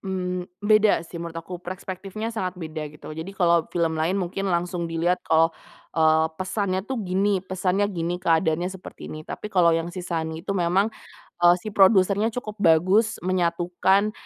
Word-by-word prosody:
Mmm, 180 Hz, -2 st, -3 dB, 0.2 s
beda 215 Hz, -4 st, +4 dB
sih 170 Hz, 0 st, -8 dB
menurut 170 Hz, -1 st, -6 dB
aku, 165 Hz, +2 st, -6 dB
perspektifnya 190 Hz, +4 st, -6 dB
sangat 185 Hz, -4 st, -3 dB
beda, 155 Hz, -3 st, -5 dB
gitu. 150 Hz, +1 st, -11 dB
Jadi 165 Hz, +5 st, -7 dB
kalau 170 Hz, -3 st, +3 dB
film 165 Hz, -2 st, -1 dB
lain 170 Hz, +5 st, +1 dB
mungkin 195 Hz, +1 st, -2 dB
langsung 175 Hz, -1 st, -1 dB
dilihat 170 Hz, +2 st, 0 dB
kalau, 165 Hz, +1 st, +4 dB, 0.4 s
eee, 160 Hz, 0 st, +4 dB
pesannya 190 Hz, 0 st, -1 dB
tuh 265 Hz, -, -2 dB
gini, 190 Hz, +1 st, +1 dB
pesannya 190 Hz, +1 st, 0 dB
gini, 175 Hz, -3 st, -2 dB
keadaannya 165 Hz, 0 st, +1 dB
seperti 190 Hz, -1 st, -10 dB
ini. 155 Hz, -, -7 dB
Tapi 210 Hz, -, -6 dB
kalau 170 Hz, -3 st, +4 dB
yang 165 Hz, +1 st, -3 dB
si 180 Hz, -, -5 dB
Sunny 160 Hz, -2 st, -3 dB
itu 195 Hz, +3 st, -3 dB
memang, 180 Hz, +4 st, +2 dB, 0.5 s
eee, 175 Hz, 0 st, +7 dB
si 215 Hz, -, -6 dB
produsernya 200 Hz, +1 st, +4 dB
cukup 215 Hz, -3 st, -6 dB
bagus 185 Hz, +6 st, +3 dB
menyatukan 180 Hz, +3 st, +1 dB
180 Hz, 165 wpm, -24 LUFS, 165-195 Hz, 0.5 s, eee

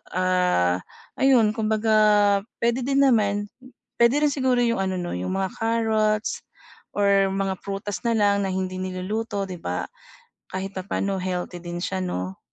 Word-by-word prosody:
ah, 180 Hz, -, +2 dB, 0.4 s
ayun 250 Hz, -5 st, +5 dB
kumbaga 215 Hz, -2 st, +3 dB, 0.2 s
puwede 240 Hz, +2 st, +1 dB
din 275 Hz, 0 st, +3 dB
naman, 205 Hz, -5 st, +2 dB, 0.5 s
puwede 235 Hz, +2 st, +5 dB
rin 295 Hz, -, +3 dB
siguro 260 Hz, -3 st, +1 dB
'yung 235 Hz, -3 st, +1 dB
ano 190 Hz, -1 st, -1 dB
'no, 175 Hz, -1 st, -4 dB
'yung 90 Hz, +1 st, -3 dB
mga 190 Hz, -1 st, -1 dB
carrots 220 Hz, -1 st, +1 dB, 0.6 s
or 200 Hz, -1 st, +3 dB
mga 195 Hz, 0 st, -1 dB
prutas 200 Hz, 0 st, -4 dB
na 235 Hz, -1 st, +1 dB
lang 200 Hz, -1 st, +3 dB
na 195 Hz, -, -1 dB
hindi 185 Hz, 0 st, -2 dB
niluluto, 200 Hz, +3 st, -3 dB
'di 185 Hz, -2 st, -7 dB
ba. 90 Hz, 0 st, -3 dB, 0.7 s
Kahit 190 Hz, +1 st, -5 dB
papaano 195 Hz, +1 st, -2 dB
healthy 180 Hz, -1 st, -3 dB
din 175 Hz, 0 st, -5 dB
siya, 190 Hz, 0 st, -2 dB
'no. 95 Hz, -, -4 dB
200 Hz, 150 wpm, -24 LUFS, 185-220 Hz, 0.7 s, ayun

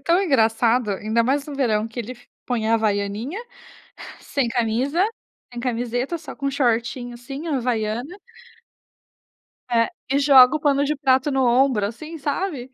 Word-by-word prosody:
tão 340 Hz, +6 st, +2 dB
engraçado, 230 Hz, -, +2 dB
ainda 215 Hz, +4 st, 0 dB
mais 275 Hz, +4 st, 0 dB
no 295 Hz, -, -7 dB
verão 225 Hz, -6 st, +1 dB
que 230 Hz, -, -10 dB
ele 235 Hz, +2 st, -6 dB
f 245 Hz, -1 st, -17 dB, 0.2 s
põe 230 Hz, -3 st, -1 dB
a 225 Hz, -, +3 dB
Havaianinha, 215 Hz, -, -1 dB, 0.8 s
sem 270 Hz, -4 st, -1 dB
camisa, 250 Hz, -, 0 dB, 0.5 s
sem 240 Hz, -, -6 dB
camiseta, 245 Hz, +5 st, -2 dB
só 310 Hz, -, -10 dB
com 275 Hz, -1 st, -2 dB
shortinho 245 Hz, -2 st, -1 dB
assim, 270 Hz, +6 st, -8 dB
a 285 Hz, -, 0 dB
Havaiana. 240 Hz, -, -2 dB, 1.5 s
É. 230 Hz, -1 st, +3 dB, 0.2 s
E 275 Hz, -, +3 dB
joga 275 Hz, -1 st, +7 dB
o -, -, -6 dB
pano 285 Hz, -1 st, +2 dB
de 300 Hz, -, 0 dB
prato 270 Hz, 0 st, +2 dB
no 265 Hz, -1 st, +1 dB
ombro 245 Hz, -4 st, +3 dB
assim, 310 Hz, +9 st, -8 dB
sabe. 285 Hz, -2 st, -3 dB
250 Hz, 155 wpm, -22 LUFS, 230-280 Hz, 1.5 s, joga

